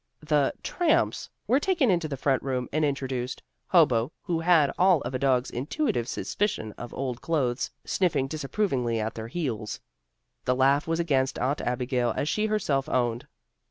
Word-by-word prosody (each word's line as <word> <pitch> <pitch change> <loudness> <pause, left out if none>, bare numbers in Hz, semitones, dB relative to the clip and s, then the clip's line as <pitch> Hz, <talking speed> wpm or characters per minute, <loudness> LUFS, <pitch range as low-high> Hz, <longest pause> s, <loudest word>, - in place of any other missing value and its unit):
The 150 -2 +2
"tramps" 340 -3 +1 0.2
were 260 - +3
taken 315 - +2
into 170 -3 +1
the 140 -3 -4
front 135 -1 +1
room 130 -2 -2
and 155 +1 +1
introduced, 130 -3 -2 0.2
Hobo, 135 -7 +4
who 170 -3 -1
had 165 -4 +4
all 180 -4 +4
of 120 - -5
a 130 - -1
dog's 130 -1 +2
intuitive 125 - -1
suspicion 160 - -2
of 120 +2 -9
old 130 -3 -4
clothes, 130 -7 0 0.2
sniffing 175 -8 +1
disapprovingly 135 - -1
at 110 +1 -2
their 110 0 -6
heels. 120 -7 -3 0.7
The 125 - +2
laugh 135 +3 +3
was 165 +1 0
against 135 -6 +1
Aunt 135 +3 0
Abigail 125 -1 0
as 145 - 0
she 215 +6 +1
herself 155 -11 0
owned. 120 -2 0
135 Hz, 160 wpm, -27 LUFS, 125-165 Hz, 0.7 s, Hobo